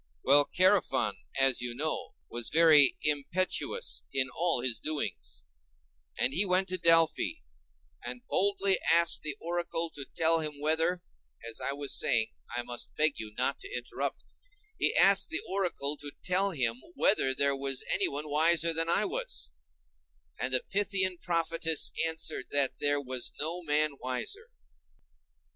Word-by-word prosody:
Well, 145 +2 +4
Chærephon, 185 -7 +2 0.3
as 135 -2 +4
you 120 -1 -3
know, 155 +4 -4
was 120 -1 -3
very 155 -4 +6
impetuous 185 - -1
in 130 -1 0
all 170 -6 +1
his 120 -2 0
doings, 155 -1 -5 0.7
and 130 - +1
he 190 - +3
went 190 0 +1
to 185 0 -2
Delphi 165 -1 +3 0.7
and 120 0 -7
boldly 200 -1 +1
asked 170 0 +4
the 150 -2 -5
oracle 170 -1 -3
to 140 -2 -8
tell 165 0 +2
him 150 -2 -5
whether—as 145 - -3
I 140 - -2
was 140 0 -4
saying, 110 -1 +1 0.2
I 120 +1 -3
must 120 0 -5
beg 155 -1 +1
you 105 -1 -8
not 130 +2 +1
to 395 - -10
interrupt—he 425 -1 -5
asked 195 0 +4
the 330 +2 -2
oracle 180 -7 -1
to 145 0 -7
tell 190 +2 +1
him 125 -8 -1
whether 135 -10 +2
there 140 0 +2
was 135 -1 -2
anyone 145 +2 -1
wiser 165 +2 +4
than 165 +1 -1
I - - +2
was, - - -5 0.9
and 130 - -2
the 130 - +1
Pythian 195 -2 0
prophetess 165 -2 +1 0.2
answered 160 -5 -1
that 140 -2 0
there 145 0 +1
was 130 -3 -3
no 165 +4 -3
man 155 -1 +1
wiser. 125 -1 -5
155 Hz, 145 wpm, -29 LUFS, 135-175 Hz, 0.9 s, very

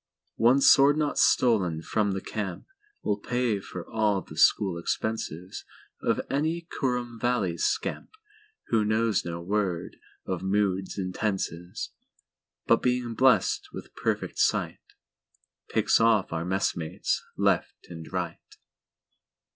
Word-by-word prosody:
One 125 +4 +4
sword 140 +2 +6
knot 150 -2 0
stolen 95 -10 +3
from 105 0 0
the 95 - -3
campWill 115 - -5
pay 120 -4 0
for 90 -2 -8
all 105 -3 +1
the - - -12
school 90 -4 +3
expensesOf 90 -3 -4
any 160 +4 -1
Kurrum 125 -3 -2
Valley 115 -7 +1
scampWho 425 - -3
knows 110 0 +1
no 85 0 -5
word 95 -2 -2 0.3
of 95 -2 -3
moods 95 -1 0
and 90 -2 -3
tenses, 90 -4 -3 0.7
But, 115 - +4
being 125 -2 0
blessed 130 +3 +3
with - - -9
perfect - - -2
sight, - - +1 0.9
Picks - - +3
off 115 -6 +3
our 80 0 -2
messmates 90 -3 -1
left - - 0
and 80 -1 -9
right. 90 -3 -3
105 Hz, 115 wpm, -27 LUFS, 95-125 Hz, 0.9 s, sword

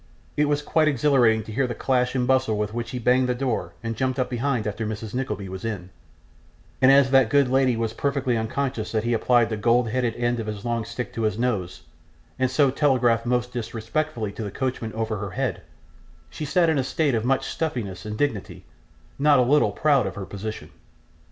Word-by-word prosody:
It 150 - +3
was 145 0 0
quite 155 +1 +2
exhilarating 125 -6 +3
to 110 - -9
hear 130 +4 0
the 120 - -4
clash 125 -1 0
and 125 -1 +1
bustle 130 -4 +2
with 105 0 -2
which 120 0 -4
he 125 - -4
banged 125 +1 +2
the 125 - +1
door 125 -2 -2
and 115 0 -3
jumped 130 +3 -1
up 130 -1 -1
behind 125 -2 -1
after 105 +1 -3
Mrs. 110 0 -5
Nickleby 105 -6 -3
was 95 0 -7
in; 100 -5 -5 0.9
and 130 - +7
as 135 -1 +5
that 135 -4 +5
good 140 +1 +4
lady 130 -2 +2
was 115 -1 -2
perfectly 140 -1 0
unconscious 115 0 -2
that 110 -1 0
he 120 +1 0
applied 120 +1 +3
the 110 - -1
gold 115 +2 +2
headed 120 -1 -1
end 120 0 0
of 110 - -4
his 105 0 -5
long 115 -2 -1
stick 120 +2 -6
to 115 - -4
his 110 -2 0
nose, 95 -7 -2 0.6
and 130 -1 +2
so 135 +1 +3
telegraphed 125 -5 +2
most 125 0 0
disrespectfully 115 +1 -3
to 110 - -6
the 105 - -4
coachman 125 0 -3
over 110 -1 -2
her 100 +1 -4
very 90 - -10
head, - - -1 0.7
she 155 - -5
sat 170 +4 +2
in 160 -3 +2
a - - +1
state 140 +2 0
of 110 -2 0
much 130 +2 +1
stiffness 120 - -3
and 105 0 -5
dignity, 125 -8 -2 0.5
not 145 0 +5
a 125 - +5
little 145 +5 +3
proud 140 -8 +2
of 95 - -6
her 100 - -5
position. 100 -4 -7
120 Hz, 215 wpm, -24 LUFS, 110-130 Hz, 0.9 s, and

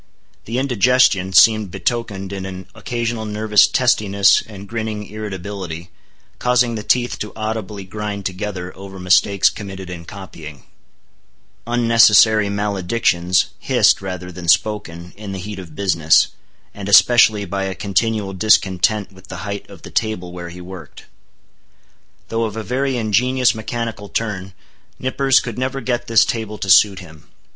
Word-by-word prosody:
The 115 +3 -3
indigestion 125 -6 +2
seemed 110 -1 +5
betokened 95 0 -3
in 95 -1 -5
an 95 -1 -8
occasional 120 -2 -3
nervous 105 0 +3
testiness 105 -6 +3
and 100 -2 -11
grinning 110 -2 -4
irritability, 95 -5 -7 0.5
causing 125 -1 +2
the 110 - -4
teeth 120 +3 0
to 105 - -5
audibly 110 -2 -4
grind 100 0 -6
together 95 -1 -5
over 95 0 -10
mistakes 95 +2 +3
committed 95 -3 -5
in 85 -2 -8
copying; 85 - -10 1.0
unnecessary 115 -3 +5
maledictions, 95 -3 0
hissed, - - +3
rather 90 -1 -6
than 90 0 -9
spoken, 90 -3 0
in 105 -2 -7
the - - -5
heat 100 +1 -7
of 85 -5 -11
business; 85 -5 +3 0.4
and 100 -1 -7
especially 110 -1 +5
by 95 +1 -3
a 95 -1 -4
continual 105 0 -1
discontent 100 +1 +2
with 95 0 -17
the - - -7
height 100 0 -6
of - - -14
the - - -10
table 110 -6 -2
where 90 -1 -7
he 90 +1 -11
worked. 90 0 -11 1.2
Though 115 0 -1
of 110 0 -5
a 110 - -4
very 130 +2 -1
ingenious 125 +4 +2
mechanical 110 -2 -5
turn, 95 -4 -4 0.4
Nippers 135 +1 +2
could 120 -1 -6
never 130 +1 -2
get 120 -1 -2
this 115 -1 +5
table 110 -2 -4
to 95 - -1
suit 100 -1 +6
him. 80 -4 -15
105 Hz, 145 wpm, -19 LUFS, 95-115 Hz, 1.2 s, suit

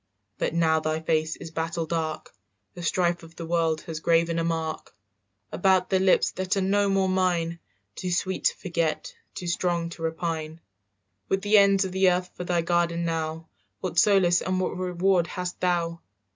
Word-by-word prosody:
"But - - -1
now 160 -1 +3
thy 155 0 -1
face 160 0 0
is 165 - -9
battle 165 +1 -2
dark; 160 -1 -3 0.4
The 175 - -9
strife 175 +1 +1
of 165 0 -14
the 165 - -6
world 165 -1 0
has 160 -2 -6
graven 165 +1 +2
a - - 0
mark 165 -1 -3 0.6
"About 185 0 +2
the 190 - +3
lips 190 0 +3
that 185 +1 -2
are - - +1
no 200 +1 +2
more 195 -1 +2
mine, 175 -3 0 0.3
Too 180 - -4
sweet 185 +1 -1
to - - +3
forget, 170 -3 -2 0.2
too 180 - -6
strong 170 -1 -1
to 170 - -10
repine. 160 -1 -3 0.7
"With 195 +1 0
the 210 0 +6
ends 200 0 +4
of 190 - -4
the 190 0 +4
earth 180 0 -1
for - - -6
thy 175 -1 +1
garden 170 0 +1
now, 160 0 -3 0.3
What 170 - 0
solace 185 -4 +4
and 185 0 -1
what 185 - -1
reward 180 -1 +1
hast 180 0 -5
thou?" 170 -2 0
170 Hz, 180 wpm, -26 LUFS, 165-185 Hz, 0.7 s, the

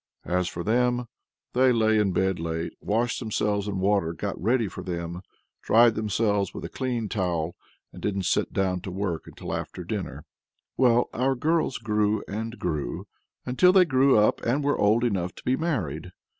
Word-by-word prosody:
As 90 0 0
for 85 0 -5
them, 125 +3 +1 0.5
they 130 0 +4
lay 110 -2 +3
in 100 -2 +2
bed 95 0 0
late, 80 0 -3
washed 115 +3 0
themselves 105 -3 -1
in 100 -2 -2
water 95 -3 +1
got 80 - -5
ready 115 +3 +2
for - - -7
them, 85 -1 -4 0.4
dried 115 +1 +5
themselves 105 -2 0
with - - -5
a - - -6
clean 125 -4 -2
towel, 90 -5 -2 0.4
and - - -10
didn't 100 -2 -1
sit 90 - +1
down 95 -2 0
to 95 - -6
work 90 -3 -3
till - - -5
after - - -5
dinner. - - -5 0.5
Well, 120 -1 +4
our 130 +3 +1
girls 155 +1 +1
grew 105 -2 0
and 115 +3 -5
grew, 75 -8 -3 0.4
until 130 +9 +4
they 185 -1 +6
grew 135 -3 +4
up 105 0 +3
and 135 +5 +1
were 145 +1 +2
old 110 +4 +3
enough 95 -7 -1
to - - -13
be 130 - +2
married. 95 - -2
105 Hz, 175 wpm, -26 LUFS, 90-120 Hz, 0.5 s, they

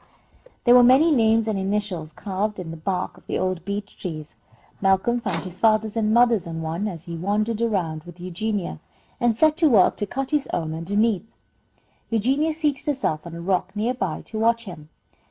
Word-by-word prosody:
There 240 - +6
were 250 - +9
many 265 +7 +6
names 225 -4 +3
and 210 -3 0
initials 190 -5 -2
carved 205 +4 -3
in 170 -3 -6
the - - -6
bark 180 +3 -3
of - - -20
the - - -1
old 185 -2 -1
beech 200 +1 -5
trees. 155 -5 -6 0.5
Malcolm 195 +5 +2
found 195 -8 -2
his 185 -1 -9
father's 220 -1 +2
and 215 -1 +1
mother's 235 -5 +4
on 165 -1 -5
one, 165 +6 -2
as 170 -6 -6
he 170 -1 -7
wandered 210 +6 -1
around 175 -9 -1
with 175 0 -12
Eugenia, 185 - -3 0.4
and 235 -2 +2
set 310 +2 +4
to 325 -3 +5
work 210 -8 +5
to 205 - -2
cut 270 +5 -3
his 295 -2 +1
own 160 -2 -2
underneath. 205 +5 0 0.8
Eugenia 265 +8 +1
seated 300 -3 -1
herself 240 - -1
on 170 - -8
a 170 - -7
rock 185 +2 -1
near 225 +4 0
by, 190 -10 -3
to 220 - -6
watch 230 +1 +2
him. 155 -7 -10
205 Hz, 190 wpm, -23 LUFS, 175-230 Hz, 0.8 s, were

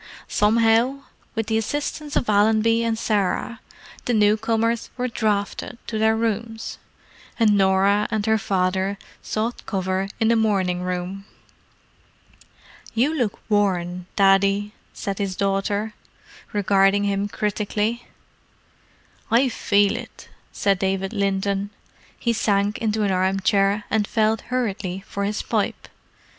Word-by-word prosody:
Somehow 230 +5 +3 0.3
with 225 0 -1
the 220 0 +1
assistance 290 +5 -3
of - - +1
Allenby 220 +2 +3
and 230 -1 0
Sarah, 215 +2 -1 0.5
the 245 - +1
newcomers 225 +2 +2
were 250 0 -1
"drafted" 215 -1 -2
to 220 - -3
their 220 0 +3
rooms, 225 0 -3 0.6
and 215 -2 +5
Norah 195 +1 +3
and 215 -2 -1
her 220 0 +3
father 190 0 0 0.2
sought 225 +3 -3
cover 190 0 -1
in 225 - +3
the 230 - +4
morning 195 -5 +1
room. 180 +2 -4 1.7
"You 260 +7 +2
look 240 -9 -2
worn, 180 -4 0
Daddy," 200 +1 +3 0.2
said 200 0 -5
his 195 -2 -2
daughter, 200 +2 -1 0.6
regarding 200 0 +3
him 200 0 0
critically. 210 +3 -2 1.2
"I 250 +3 +4
feel 205 -3 +2
it," - - -9 0.2
said 195 -2 +1
David 195 +1 -1
Linton. 200 0 0 0.5
He 235 - 0
sank 205 -1 +1
into 220 -1 0
an 200 - +1
armchair 195 +2 +2
and 210 -1 +1
felt 220 -1 +1
hurriedly 195 -7 -2
for 200 -1 -3
his 210 +1 -2
pipe. - - -2
205 Hz, 120 wpm, -23 LUFS, 195-225 Hz, 1.7 s, and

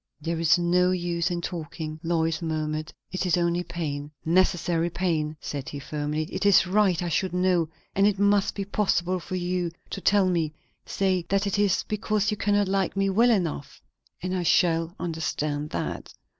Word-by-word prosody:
"There 165 +2 -3
is 165 +2 +4
no 180 +1 +3
use 175 -1 0
in 175 -1 -2
talking," 160 -2 -5
Lois 165 -1 0
murmured. 155 -1 -2 0.2
"It 185 0 -2
is 180 - +3
only 170 0 +1
pain." 150 -4 -4 0.2
"Necessary 175 -1 +2
pain," 160 -4 -1
said 140 -2 -5
he 145 - -6
firmly. 150 +2 -3
"It - - -3
is 200 -2 +6
right 185 -2 +2
I - - -2
should 185 +2 0
know, 180 -3 +2 0.3
and 195 +1 +4
it 205 -1 +1
must 200 0 +2
be 200 - -3
possible 185 -3 0
for 185 +2 -6
you 180 -1 -1 0.2
to 195 - -4
tell 200 -1 +4
me. 165 -4 0 0.3
Say 185 -3 0
that 195 +1 +2
it 200 0 0
is 205 -3 +2
because 210 0 0
you 210 - -2
cannot 205 0 +2
like 195 0 0
me 195 0 +2
well 230 +5 +4
enough 175 -10 -1 0.4
and 185 0 -1
I 185 - 0
shall 165 0 +2
understand 155 -3 -2
that." - - -4
175 Hz, 180 wpm, -26 LUFS, 160-190 Hz, 0.4 s, is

